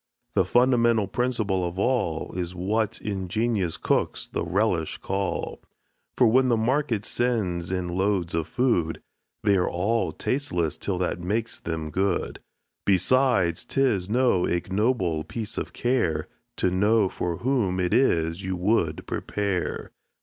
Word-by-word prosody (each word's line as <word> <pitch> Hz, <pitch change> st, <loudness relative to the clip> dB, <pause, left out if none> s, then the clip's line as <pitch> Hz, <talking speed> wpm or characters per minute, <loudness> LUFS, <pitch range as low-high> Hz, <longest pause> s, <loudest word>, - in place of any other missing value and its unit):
The -, -, +3 dB
fundamental 120 Hz, -3 st, +3 dB
principle 110 Hz, -5 st, 0 dB
of 90 Hz, +1 st, -3 dB
all 100 Hz, -8 st, 0 dB
Is 90 Hz, 0 st, -4 dB
what 110 Hz, +5 st, -1 dB
ingenious 100 Hz, -1 st, -1 dB
cooks -, -, 0 dB
the -, -, -3 dB
relish 85 Hz, -2 st, 0 dB
call; 95 Hz, 0 st, -3 dB, 0.6 s
For 125 Hz, -, +5 dB
when 130 Hz, +3 st, +4 dB
the 120 Hz, -, +3 dB
market 120 Hz, -2 st, 0 dB
sends 95 Hz, -9 st, -1 dB
in 90 Hz, -1 st, -1 dB
loads 95 Hz, -1 st, 0 dB
of 80 Hz, -1 st, -1 dB
food, 120 Hz, -11 st, +1 dB, 0.4 s
They 100 Hz, -2 st, +4 dB
all 100 Hz, +6 st, 0 dB
are -, -, -4 dB
tasteless 90 Hz, -, -2 dB
till 95 Hz, -3 st, -2 dB
that 90 Hz, 0 st, -1 dB
makes 105 Hz, +6 st, -2 dB
them 80 Hz, -2 st, -4 dB
good. 95 Hz, +2 st, -1 dB, 0.4 s
Besides, 100 Hz, -2 st, +3 dB
'tis 115 Hz, -9 st, 0 dB
no 120 Hz, -6 st, +3 dB
ignoble 95 Hz, -2 st, 0 dB
piece 110 Hz, +2 st, -5 dB
of -, -, -5 dB
care, 105 Hz, -12 st, 0 dB, 0.3 s
To 90 Hz, -, +1 dB
know 105 Hz, +3 st, +3 dB
for 90 Hz, -2 st, -3 dB
whom 115 Hz, -8 st, 0 dB
it 90 Hz, -1 st, 0 dB
is 85 Hz, -8 st, +2 dB
you 95 Hz, 0 st, -2 dB
would 90 Hz, -4 st, 0 dB
prepare. 100 Hz, -4 st, -2 dB
100 Hz, 135 wpm, -25 LUFS, 90-115 Hz, 0.6 s, For